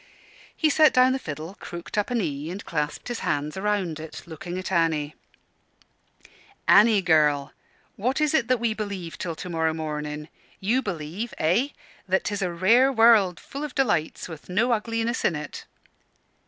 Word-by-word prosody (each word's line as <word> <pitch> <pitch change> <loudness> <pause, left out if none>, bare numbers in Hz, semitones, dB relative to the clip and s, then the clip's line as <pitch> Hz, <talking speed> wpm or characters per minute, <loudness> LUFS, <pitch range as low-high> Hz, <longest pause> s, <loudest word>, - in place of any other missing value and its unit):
He 310 -2 +3
set 310 0 +5
down 255 +1 +5
the 265 - -1
fiddle, 155 - -7
crooked 170 0 -8
up 210 +2 0
a 245 - -1
knee 155 -8 -2
and 190 +4 -7
clasped 150 -2 -3
his 240 -2 -3
hands 145 +1 -2
round 190 -5 -1
it, 160 0 -8
looking 175 +2 -7
at 185 0 -5
Annie. 160 -4 +1 1.5
"Annie, 210 -2 +6
girl, 150 -4 +3 0.4
what 255 +8 0
is 300 -1 +2
it 240 -7 +2
that 255 -1 +2
we 230 -1 0
believe 200 -6 -5
till 170 -3 -3
to 180 - -7
morrow 160 -2 0
morning? 150 -1 -4 0.3
You 230 +7 +1
believe 190 - -5
eh? 185 - +2 0.4
that 190 +1 +1
'tis 205 -1 -2
a 180 -2 0
rare 225 +10 +4
world, 225 -7 +5
full 280 +1 -7
of 300 - -6
delights, 175 - 0
and - - -14
with 160 - -13
no 225 +7 +2
ugliness 230 +2 -1
in 170 - +2
it?" 150 -1 -7
185 Hz, 170 wpm, -25 LUFS, 160-230 Hz, 1.5 s, Annie